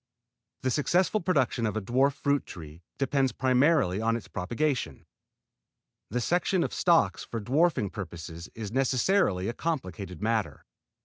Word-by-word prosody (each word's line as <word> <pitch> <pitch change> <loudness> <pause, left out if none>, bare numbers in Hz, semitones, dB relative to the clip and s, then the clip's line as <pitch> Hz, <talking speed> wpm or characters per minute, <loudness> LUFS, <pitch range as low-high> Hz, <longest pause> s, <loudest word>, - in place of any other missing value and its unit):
The 130 - +1
successful 175 - +2
production 135 -9 +1
of 105 0 -2
a - - -1
dwarf 130 +6 +2
fruit 140 0 0
tree 80 -1 -10 0.2
depends 135 -1 +1
primarily 130 - +2
on 115 +1 +1
its 110 -5 -6
propagation. 120 +10 -2 1.0
The 125 - -1
selection 175 +6 +1
of - - -3
stocks 170 -2 +2
for 115 - -5
dwarfing 130 - +1
purposes 85 -3 -7
is 110 -3 -6
necessarily 130 - +2
a 115 - -2
complicated 95 - -4
matter. 105 -9 -1
120 Hz, 135 wpm, -28 LUFS, 100-145 Hz, 1.0 s, successful